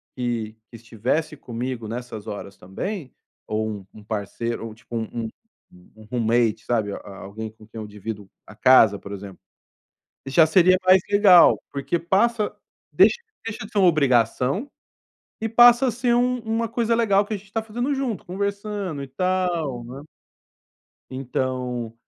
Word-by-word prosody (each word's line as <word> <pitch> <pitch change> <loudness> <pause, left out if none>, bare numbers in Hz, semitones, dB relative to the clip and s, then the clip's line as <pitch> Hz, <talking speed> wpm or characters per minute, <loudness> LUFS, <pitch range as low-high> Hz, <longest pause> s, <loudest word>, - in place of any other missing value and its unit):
que 120 -3 -3 0.2
que 115 - -13
estivesse 125 +8 -2
comigo 120 -2 -5
nessas 115 -2 -7
horas, 100 -1 -7
também, 135 - -6 0.3
ou 110 0 -1
um 100 -3 -7
um 105 - -13
parceiro 115 +2 -4
ou, 110 - -9
tipo, 115 +1 -10
um 115 0 -4 0.7
um 110 - -14
roommate, 115 -2 +1
sabe, 110 -4 0
a 100 -1 -9
alguém 110 +3 -7
com 110 -1 -18
quem 110 - -9
eu 105 - -7
divido 105 -1 -7 0.2
a 105 - -13
casa, 115 -5 +6
por 100 - -10
exemplo, 100 -1 -8 0.9
já 155 +4 +5
seria 185 +3 +5
mais 185 0 +7
legal. 200 -4 +7
Porque 140 +5 -1
passa 210 +5 +1 0.4
deixa - - +5 0.3
deixa 225 -2 -5
de 220 - -20
ser 205 - 0
uma 185 -2 +6
obrigação, 135 - +1 0.7
e 225 - -1
passa 240 +2 +7
a - - +2
ser 240 +1 0
um 250 +1 +1
uma 225 0 -1
coisa 235 -1 0
legal 205 -3 +3
que 215 - -5
a - - -1
gente 195 +1 -18
tá 225 - 0
fazendo 240 +6 -2
junto 255 -6 -3
conversando 200 -3 -3
e - - -7
tal, 170 -5 -1
né? 135 +5 -9 1.0
Então 125 -2 -3
130 Hz, 160 wpm, -23 LUFS, -, 1.0 s, mais